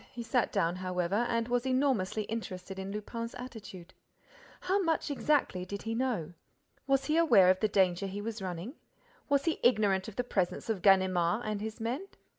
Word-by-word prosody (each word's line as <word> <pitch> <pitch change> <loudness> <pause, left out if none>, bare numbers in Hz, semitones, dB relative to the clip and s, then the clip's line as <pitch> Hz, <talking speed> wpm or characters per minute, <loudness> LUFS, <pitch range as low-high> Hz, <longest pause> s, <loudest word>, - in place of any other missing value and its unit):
He 240 - -6
sat 240 +1 +1
down, 180 -3 0
however, 185 +4 -1
and 230 -1 0
was 245 0 +1
enormously 255 -6 +1
interested 190 -4 -6
in 190 +1 -5
Lupin's 230 +3 -5
attitude. 215 -8 -9 0.7
How 390 +2 +1
much 325 -4 0
exactly 280 -10 +1
did 200 +2 -6
he 225 - -3
know? 230 -10 -1 0.5
Was 275 0 +2
he 305 +3 +1
aware 225 - +6
of 185 - 0
the 215 - +2
danger 190 -1 +2
he 195 +2 -5
was 220 0 -5
running? 185 +5 -5 0.6
Was 280 -1 +2
he 330 - 0
ignorant 205 -5 +3
of 220 - -8
the 245 - -1
presence 195 -1 -1
of 200 -5 -3
Ganimard 185 +1 +3
and 210 -1 -2
his 220 +2 -5
men? 250 - -3
215 Hz, 180 wpm, -31 LUFS, 185-245 Hz, 0.7 s, aware